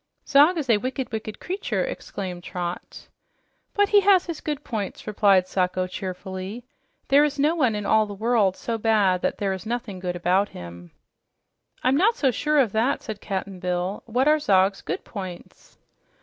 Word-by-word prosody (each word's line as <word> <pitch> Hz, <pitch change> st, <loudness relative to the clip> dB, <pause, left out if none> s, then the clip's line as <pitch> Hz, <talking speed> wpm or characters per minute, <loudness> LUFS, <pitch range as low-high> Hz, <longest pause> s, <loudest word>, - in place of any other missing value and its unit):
"Zog 295 Hz, +5 st, +5 dB
is 295 Hz, -4 st, -2 dB
a 230 Hz, -3 st, +4 dB
wicked, 260 Hz, +2 st, -4 dB
wicked 215 Hz, -1 st, -5 dB
creature!" 380 Hz, +3 st, -2 dB
exclaimed 190 Hz, -, -6 dB
Trot. 175 Hz, -1 st, -6 dB, 0.7 s
"But 410 Hz, 0 st, +3 dB
he 415 Hz, -, +6 dB
had 390 Hz, -2 st, +5 dB
his 335 Hz, -3 st, -6 dB
good 295 Hz, -1 st, -4 dB
points," 210 Hz, -6 st, -5 dB
replied 200 Hz, -3 st, +3 dB
Sacho 185 Hz, 0 st, 0 dB
cheerfully. 190 Hz, +4 st, -6 dB, 0.5 s
"There 280 Hz, +2 st, +6 dB
is 295 Hz, -1 st, 0 dB
no 295 Hz, +3 st, +3 dB
one 260 Hz, -10 st, +1 dB
about 210 Hz, +1 st, +2 dB
in 215 Hz, -, 0 dB
the 205 Hz, -, -7 dB
world 215 Hz, -3 st, +2 dB
so 230 Hz, -1 st, -3 dB
bad 205 Hz, -5 st, +2 dB
that -, -, -1 dB
there 195 Hz, -2 st, -1 dB
is 190 Hz, -, -6 dB
nothing 230 Hz, -5 st, -4 dB
good 180 Hz, -1 st, -3 dB
about 180 Hz, +3 st, +1 dB
him." 85 Hz, 0 st, -10 dB, 0.9 s
"I'm 260 Hz, +2 st, +3 dB
not 430 Hz, +8 st, +3 dB
so 270 Hz, -, +2 dB
sure 300 Hz, +5 st, 0 dB
of 255 Hz, -7 st, +3 dB
that," 225 Hz, +6 st, 0 dB
said 215 Hz, -3 st, -6 dB
Cap'n 190 Hz, -1 st, -4 dB
Bill. 180 Hz, +2 st, -2 dB
"What 250 Hz, +5 st, +1 dB
are 305 Hz, 0 st, +5 dB
Zog's 195 Hz, -6 st, +2 dB
good -, -, -4 dB
points?" 185 Hz, -3 st, -9 dB
215 Hz, 180 wpm, -24 LUFS, 185-275 Hz, 0.9 s, he